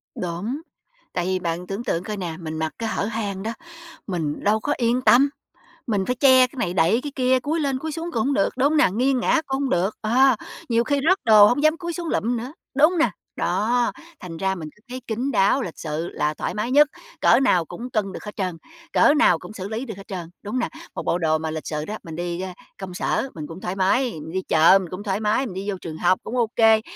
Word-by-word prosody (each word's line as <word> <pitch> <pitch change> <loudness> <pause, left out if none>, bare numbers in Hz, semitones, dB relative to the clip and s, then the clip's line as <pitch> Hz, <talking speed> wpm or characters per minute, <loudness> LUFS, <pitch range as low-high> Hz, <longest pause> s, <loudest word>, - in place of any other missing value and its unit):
Đúng, 185 - -4 0.5
tại 175 -1 -1
vì 185 0 0
bạn 175 0 -3
tưởng 200 +4 -4
tượng 175 -7 -1
coi 210 0 -5
nè, 170 -4 -4
mình 160 -1 -5
mặc 160 0 -2
cái 225 -1 -2
hở 200 - -1
hang 205 -3 -3
đó, 225 - -2 0.6
mình 160 -6 -3
đâu 215 +2 +3
có 290 - -1
yên 240 +1 +1
tâm, 270 +4 +6 0.6
mình 200 -4 0
phải 250 - -1
che 260 -1 +6
cái 265 - -17
này, 180 -7 -1
đậy 185 +7 +3
cái 290 - -4
kia, 255 -1 +3
cúi 310 +6 -1
lên 275 -3 0
cúi 315 +1 -4
xuống 330 +2 -5
cũng 225 +2 0
hông 280 - +1
được, 300 - +2
đúng 275 +3 +3
không 310 - +1
nè? 295 - +5
Nghiêng 255 +3 +2
ngã 310 - +2
cũng 270 0 -1
hông 270 - 0
được, 190 +4 +1
à, 250 +3 +4 0.3
nhiều 230 0 +3
khi 285 +1 0
rớt 380 - +4
đồ 215 -2 +8
hông 285 +5 +1
dám 310 +1 +4
cúi 345 -1 -4
xuống 340 -1 -5
lụm 240 -4 0
nữa, 250 +5 -6 0.2
đúng 300 +3 +6
hông 350 - -1
nè? 325 - +4 0.3
Đó, 240 +3 +1 0.3
thành 170 -3 -8
ra 190 +1 0
mình 155 -3 -7
cứ 210 - -26
thấy 255 +1 -6
kín 245 +5 -2
đáo, 210 +5 +3
lịch 175 -8 -6
sự 160 +2 -3
là 150 +1 -1
thoải - - -4
mái 220 +4 -2
nhất, 295 +2 +6 0.3
cỡ - - +6
nào 180 -11 +3
cũng 240 +9 -7
cân 210 -5 -1
được - - -8
hết 210 - -8
trơn, 185 -4 -2 0.4
cỡ 290 - +5
nào 180 - +4
cũng - - -10
xử 195 -1 -6
lý 225 +4 -3
được 220 -5 -7
hết 195 - -12
trơn, 175 -4 -6
đúng 205 - -6
hông - - +1
nè? - - -1 0.3
Một - - -4
bộ - - +1
đồ 155 -2 +2
mà 160 0 -4
lịch 155 -1 -5
sự 150 0 -3
đó, 215 +1 -5
mình 160 -1 -8
đi, 175 +1 -3
ơ, 190 - -4 0.3
công 190 -2 -7
sở 265 +8 -1
mình 150 -2 -6
cũng 165 +3 -9
thoải 180 +2 -3
mái, 225 +6 +2
mình 160 0 -8
đi 190 +2 -1
chợ 165 +3 +5
mình 180 - -7
cũng 185 +3 -6
thoải 200 -1 -1
mái, 220 +5 +1
mình 210 - -6
đi 195 +2 -4
vô 195 - -1
trường 160 -2 -6
học 180 +2 +2
cũng 250 - -4
ô 235 -2 +2
kê, 225 -1 +5
215 Hz, 265 wpm, -23 LUFS, 180-255 Hz, 0.6 s, đồ